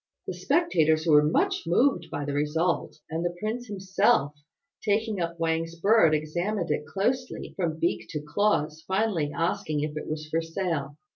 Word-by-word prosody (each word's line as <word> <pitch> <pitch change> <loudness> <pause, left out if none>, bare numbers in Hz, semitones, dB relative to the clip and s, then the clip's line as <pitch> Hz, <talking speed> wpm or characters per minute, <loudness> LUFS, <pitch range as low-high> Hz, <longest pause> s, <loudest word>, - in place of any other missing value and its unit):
The - - -4
spectators 180 - +2
were 150 -3 +6
much 150 +2 +1
moved 175 -1 +2
by 145 - -4
the 145 - -3
result; 155 +4 0
and 160 +1 -3
the 175 0 -2
prince 230 +4 -3
himself, 195 -5 +2 0.5
taking 210 -1 0
up 170 0 -3
Wang's 165 0 -1
bird, 200 -5 +5
examined 175 +5 -2
it 150 - -1
closely 250 - -2
from 165 -4 -1
beak 170 +1 -1
to 150 - -3
claws, 155 -1 0
finally 190 -7 0
asking 155 0 -1
if 150 0 -3
it 155 - -5
was 155 0 -4
for 160 +2 0
sale. 165 -4 -3
165 Hz, 160 wpm, -27 LUFS, 155-200 Hz, 0.5 s, were